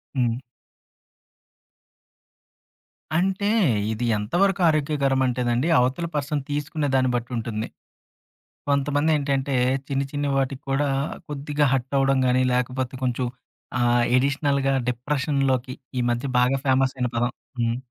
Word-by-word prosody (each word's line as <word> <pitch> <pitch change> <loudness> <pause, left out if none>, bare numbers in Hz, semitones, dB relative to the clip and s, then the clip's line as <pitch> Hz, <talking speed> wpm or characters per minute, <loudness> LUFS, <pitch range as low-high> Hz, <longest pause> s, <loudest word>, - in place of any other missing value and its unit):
హ్మ్. 120 -3 +1 2.8
అంటే 190 +3 +1 0.5
ఇది 110 +2 -2
ఎంత 105 +2 -6
వరకు 195 -1 +1
ఆరోగ్యకరం 140 -3 +1
అంటేనండి, 125 +2 0
అవతల 130 +7 +1
పర్సన్ 145 0 -1
తీసుకునే 145 +1 -2
దాన్ని 130 -1 +3
బట్టి 120 +1 -3
ఉంటుంది. 110 -1 -3 1.0
కొంతమంది 145 +2 +1
ఏంటంటే 140 -1 -1 0.3
చిన్ని, 140 -1 -1
చిన్ని 145 -1 -1
వాటికి 135 0 -1
కూడా 145 +2 +1 0.4
కొద్దిగా 145 +1 0
హర్ట్ 135 +1 -1
అవ్వడం 135 0 +3
గాని, 125 +1 +3
లేకపోతే 125 +1 -1
కొంచెం 125 0 0 0.5
ఆహ్, 120 0 +3
అడిషనల్‌గా 140 +1 +1 0.2
డిప్రెషన్‌లోకి 130 0 0 0.3
ఈ - - +1
మధ్య 120 +3 -2
బాగా 125 +2 +3
ఫేమస్ 135 0 +3
అయిన 125 -1 0
పదం. 120 +1 +1 0.3
హ్మ్. 115 0 +1
135 Hz, 115 wpm, -24 LUFS, 125-145 Hz, 2.8 s, దాన్ని